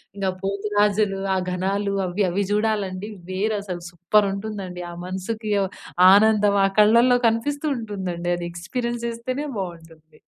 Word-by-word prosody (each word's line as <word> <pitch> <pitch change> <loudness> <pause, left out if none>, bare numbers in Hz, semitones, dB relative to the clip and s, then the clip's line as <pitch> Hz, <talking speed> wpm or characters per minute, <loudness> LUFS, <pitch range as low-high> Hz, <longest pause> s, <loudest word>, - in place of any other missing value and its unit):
ఇంగా 195 -2 -1
పోతురాజులు, 205 0 +1 0.2
ఆ - - +1
ఘనాలు 200 +2 -1
అవ్వి, 190 +3 0
అవి 200 +3 0
జూడాలండి 210 -2 -1 0.2
వేరసలు 195 -2 -2
సూపరుంటుందండి. 195 0 -1
ఆ - - -9
మనసుకి 210 +4 -4
ఓ - - +1 0.5
ఆనందం 205 -1 +4
ఆ - - +4
కళ్ళలో 235 +4 +6
కనిపిస్తూ 285 +7 -1
ఉంటుందండి. 185 -6 -4
అది 175 - -4
ఎక్స్‌పీరియన్స్ 235 +7 -4
చేస్తేనే 255 +5 -4
బావుంటుంది. 165 -3 -9
200 Hz, 120 wpm, -23 LUFS, 185-220 Hz, 0.5 s, కళ్ళలో